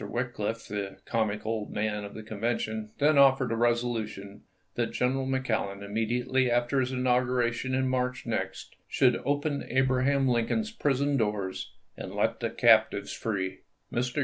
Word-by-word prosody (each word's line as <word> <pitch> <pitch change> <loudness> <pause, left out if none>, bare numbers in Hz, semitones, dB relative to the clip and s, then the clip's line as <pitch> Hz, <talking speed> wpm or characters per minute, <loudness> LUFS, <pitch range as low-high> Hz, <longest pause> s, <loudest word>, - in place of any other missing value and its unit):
"Wickliffe, 115 -2 -3
the 100 -2 -4
comic 110 -2 -1
old 110 -1 -2
man 105 0 -1
of 100 - -8
the 110 - -7
Convention, 110 0 -2
then 145 0 +4
offered 135 -2 +5
a - - +1
resolu 120 -1 +1
tion 100 -1 -10 0.3
that - - -2
General 130 +1 0
McClellan, 110 -7 -1
immediately 120 +5 0
after 120 +3 +2
his 130 0 0
inauguration 125 0 +1
in 130 0 +1
March 125 -1 -1
next, - - -4
should 125 -2 +3
" - - -19
open 145 0 0
Abra 130 0 +1
ham 140 -1 +3
Lincoln's 125 - +1
prison 140 - +1
doors 105 -5 -2 0.2
and - - -7
let - - +1
the - - -1
captives 110 -3 +4
free." 95 -4 -3 0.3
Mr. 125 +4 -1
120 Hz, 155 wpm, -28 LUFS, 110-130 Hz, 0.3 s, offered